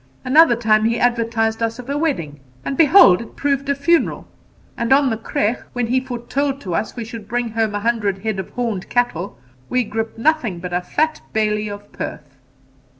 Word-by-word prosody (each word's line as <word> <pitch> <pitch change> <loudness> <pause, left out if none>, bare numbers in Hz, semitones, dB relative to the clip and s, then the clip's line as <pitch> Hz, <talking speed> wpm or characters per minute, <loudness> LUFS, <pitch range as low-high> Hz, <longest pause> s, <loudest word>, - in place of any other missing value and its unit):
Another 275 0 +6
time 215 -2 +2
he 230 +1 +1
advertised 230 -2 +1
us 225 0 -1
of 250 -1 -9
a 280 - -2
wedding, 215 - -2 0.3
and 275 - -2
behold 295 - +7
it 230 - -11
proved 280 0 -1
a 280 - +2
funeral; 325 +4 +1 0.5
and 235 +1 -2
on 270 -1 +5
the - - 0
creagh, 220 +1 -1
when 245 -1 -1
he 250 +3 +1
foretold 260 +2 -3
to 180 - -5
us 185 +6 -2
we 235 -2 -5
should 225 -2 -9
bring 240 +1 -1
home 220 -1 -1
a 205 - -2
hundred 215 -4 0
head 220 -3 -2
of 190 - -5
horned 230 -6 -3
cattle, 200 - -1 0.3
we 250 0 +2
gripped 225 +1 -4
nothing 245 - +1
but 180 +1 -6
a 180 - +1
fat 310 +12 -1
bailie 210 -1 0
of 205 0 -9
Perth.' 145 -3 -7
230 Hz, 195 wpm, -20 LUFS, 210-260 Hz, 0.5 s, behold